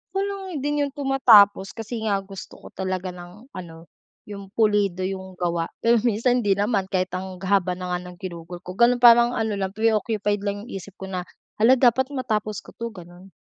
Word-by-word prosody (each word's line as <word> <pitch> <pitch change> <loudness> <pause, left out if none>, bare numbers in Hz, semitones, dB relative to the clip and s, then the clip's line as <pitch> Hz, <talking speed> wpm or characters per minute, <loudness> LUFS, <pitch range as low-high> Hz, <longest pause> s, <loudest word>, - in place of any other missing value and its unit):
Ako 390 - +1
lang 385 -7 -5
din 295 0 0
yung 275 - -11
tumatapos. 225 -8 +4
Kasi 225 +1 -5
nga, 200 - +2
gusto 195 -1 -10
ko - - -14
talaga 185 -1 -3
ng 180 +9 -13
ano, 165 -2 -11 0.3
yung 200 -1 -9
pulido 205 -4 +2
yung 190 0 -5
gawa. 170 -2 -1 0.2
Pero 235 0 +4
minsan 245 +2 +2
hindi 205 -4 +2
naman 200 -1 0
kahit 185 -1 -1
ang 185 0 -5
haba 190 -2 +1
na 180 0 -6
nga 180 - -1
ng 180 - -10
ginugol 175 -1 -8
ko. 180 - -7
Gano'n 240 +3 +4
parang 240 +1 +7
ano 220 -2 -1
lang, 190 -1 -2
preoccupied 215 -2 0
lang 205 0 -3
yung - - -11
isip 195 0 -8
ko 190 - -6
na, 180 -1 -3 0.4
"Hala, 240 +4 +6
dapat 255 +1 +3
matapos 215 -6 -2
ko - - -14
'to," 235 - -4
gano'n. 175 -1 -13
205 Hz, 195 wpm, -23 LUFS, 185-235 Hz, 0.4 s, parang